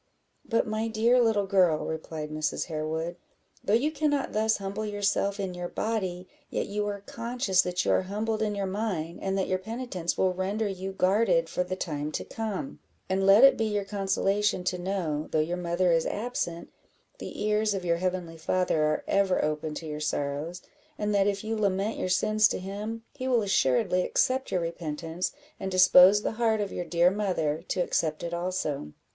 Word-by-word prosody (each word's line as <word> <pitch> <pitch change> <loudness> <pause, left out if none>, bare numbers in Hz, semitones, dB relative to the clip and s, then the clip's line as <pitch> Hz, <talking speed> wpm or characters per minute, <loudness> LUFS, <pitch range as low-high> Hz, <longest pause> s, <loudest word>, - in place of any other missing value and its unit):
"But, 230 - +1
my 215 +1 -2
dear 230 +3 +3
little 220 -4 +2
girl," 185 -5 +3
replied 155 -1 -5
Mrs. 155 0 -1
Harewood, 160 +2 -3 0.5
"though 205 - +3
you 285 +7 +2
cannot 295 -3 0
thus 220 +1 +2
humble 195 +2 -4
yourself 205 -1 0
in 190 -2 -3
your 175 0 -4
body, 185 -4 -3 0.2
yet - - -1
you 205 +1 -2
are 200 -1 -4
conscious 230 -3 0
that 180 0 -2
you - - +2
are - - +3
humbled 215 +3 -2
in 210 -1 0
your 200 -1 -1
mind, 190 -5 -3
and 195 0 -1
that 190 - 0
your 185 0 0
penitence 220 -4 -4
will 185 -1 +2
render 200 +4 -1
you 190 -1 -4
guarded 210 - +2
for 180 - 0
the 185 +1 -4
time 150 -4 -3
to - - -2
come; 225 +5 -5 0.3
and 190 +1 +1
let 200 +5 +8
it 275 - +8
be 225 - +1
your 210 -2 -1
consolation 195 0 0
to 180 0 -1
know, 175 -5 -2
though - - 0
your 160 +3 0
mother 175 0 +1
is 165 -1 +2
absent, 205 -7 -3 0.5
the - - -6
ears 210 0 +2
of 185 -2 -4
your 170 -1 +2
heavenly 180 -2 -3
Father 170 0 0
are 155 0 +1
ever 195 -4 +2
open 150 0 -2
to 165 - -6
your 150 -1 -5
sorrows; 150 +3 -3 0.3
and 210 0 -1
that, 200 -1 +3
if 200 0 -1
you 220 +1 -2
lament 200 0 0
your 185 - -1
sins 215 +4 +4
to - - -2
him, 210 +4 -5
he 260 -2 -5
will 240 -4 +3
assuredly 180 -1 +2
accept 260 +7 +1
your 180 - +1
repentance, 165 +1 -3 0.3
and 190 - -3
dispose 185 +2 +7
the - - 0
heart 220 -2 +3
of 205 -2 -2
your 175 - -3
dear 170 +2 +3
mother 175 -7 -1
to 185 - 0
accept 155 -3 -1
it 170 0 -4
also. 170 - -3
190 Hz, 190 wpm, -28 LUFS, 170-210 Hz, 0.5 s, let